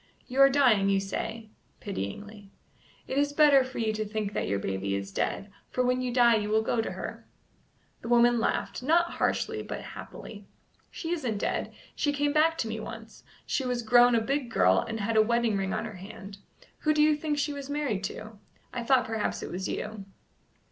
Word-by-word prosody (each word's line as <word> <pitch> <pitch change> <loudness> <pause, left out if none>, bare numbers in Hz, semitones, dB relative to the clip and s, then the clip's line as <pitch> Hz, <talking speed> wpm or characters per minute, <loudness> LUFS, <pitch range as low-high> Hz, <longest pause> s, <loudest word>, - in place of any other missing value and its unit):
"You 260 +2 0
are 275 - +9
dying, 245 -8 +4
you 195 0 +3
say" 220 +3 -5 0.3
pityingly. 205 - -6 0.6
"It 270 - 0
is 285 0 +1
better 290 -3 +6
for 260 0 -9
you 220 -2 0
to 215 0 -2
think 210 -1 -3
that - - -2
your 100 - 0
baby 100 0 -2
is 100 0 -4
dead, 200 - -2 0.2
for 255 - 0
when 250 0 +1
you 250 -1 -2
die 235 -2 +5
you 210 -1 -2
will 220 +1 +2
go 225 +1 +1
to - - -4
her." - - -7 0.7
The - - -8
woman 240 0 +4
laughed, 230 - -1
not 340 +6 +3
harshly, - - -1
but - - -6
happily. 205 -2 -10 0.4
"She 330 - -5
isn't 255 -11 -1
dead. - - -2 0.2
She 290 - +1
came 290 0 0
back 320 +2 +3
to 230 - -1
me 220 0 -4
once. 225 0 -9 0.2
She 270 - -1
was 250 -2 -2
grown 240 +1 +6
a 230 - +3
big 270 +2 -1
girl, 95 - +4
and 225 0 -4
had 220 +2 0
a - - +8
wedding 235 0 +1
ring 195 -1 -1
on - - -2
her 215 -4 -8
hand. 200 +1 -10 0.4
Who 305 -1 +1
do 300 - +4
you 305 0 +4
think 295 0 -2
she 290 0 -1
was 280 -1 -7
married 285 -9 -1
to? 215 +1 -7 0.3
I 245 - -3
thought 255 +1 +3
perhaps 220 -1 -2
it - - -6
was 190 +2 -3
you." 210 -2 -5
230 Hz, 205 wpm, -28 LUFS, 210-270 Hz, 0.7 s, are